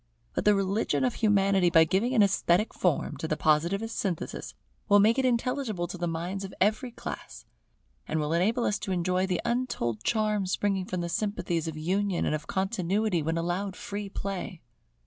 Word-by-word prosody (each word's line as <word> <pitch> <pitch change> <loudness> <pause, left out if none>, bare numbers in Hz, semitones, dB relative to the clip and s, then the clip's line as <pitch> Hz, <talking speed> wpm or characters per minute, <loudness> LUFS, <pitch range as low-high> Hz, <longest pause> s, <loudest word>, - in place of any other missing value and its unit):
But - - -2
the 210 0 +6
religion 195 +6 0
of 250 -2 +1
Humanity, 195 -4 +3
by 165 -1 +6
giving 200 +10 +1
an 215 - +6
esthetic 195 +1 +2
form 155 -4 0
to 160 - -4
the 155 - -1
Positivist 170 +9 +1
synthesis, 180 -6 -3 0.3
will 205 - +7
make 220 +5 +4
it 265 - +2
intelligible 240 -5 0
to 175 -1 -3
minds 175 +4 -3
of 195 - -7
every 215 +5 +1
class: 235 - -8 0.6
and 160 - -1
will 150 +1 -1
enable 215 +8 +2
us 210 - 0
to 195 - -4
enjoy 185 +1 +1
the 180 -2 -1
untold 235 - -1
charm 215 -3 +1
springing 195 0 0
from 185 -1 -3
the 170 - -2
sympathies 175 -3 -1
of 160 -1 -5
union 185 +3 0
and - - 0
of 155 +1 -4
continuity 190 -1 0
when 160 +2 -1
allowed 180 +3 -2
free 205 -4 -5
play. 195 -3 -5
195 Hz, 180 wpm, -28 LUFS, 170-210 Hz, 0.6 s, will